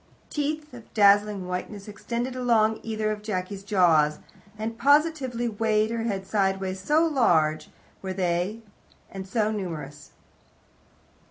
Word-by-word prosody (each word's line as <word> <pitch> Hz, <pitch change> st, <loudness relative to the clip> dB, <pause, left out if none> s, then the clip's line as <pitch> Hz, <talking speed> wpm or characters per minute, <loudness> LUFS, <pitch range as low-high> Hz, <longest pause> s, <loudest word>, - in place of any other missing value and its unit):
Teeth 300 Hz, 0 st, -3 dB
of 235 Hz, -2 st, -12 dB
dazzling 205 Hz, -2 st, +4 dB
whiteness 195 Hz, +3 st, -5 dB
extended 235 Hz, +4 st, -4 dB
along 225 Hz, -3 st, +2 dB
either 215 Hz, -1 st, -2 dB
of 210 Hz, -1 st, -4 dB
Jacky's 195 Hz, -1 st, -4 dB
jaws, 170 Hz, -7 st, +3 dB, 0.4 s
and 220 Hz, +1 st, -4 dB
positively 280 Hz, -3 st, +2 dB
weighted 220 Hz, 0 st, +1 dB
her 230 Hz, -, -2 dB
head 195 Hz, -4 st, -2 dB
sideways, 190 Hz, -2 st, -1 dB
so 300 Hz, -, +2 dB
large 165 Hz, -, +2 dB, 0.3 s
were 190 Hz, -, -4 dB
they 185 Hz, +3 st, -1 dB, 0.5 s
and 190 Hz, -1 st, -7 dB
so 215 Hz, +1 st, 0 dB
numerous. 155 Hz, -8 st, -6 dB
210 Hz, 120 wpm, -26 LUFS, 190-235 Hz, 0.5 s, dazzling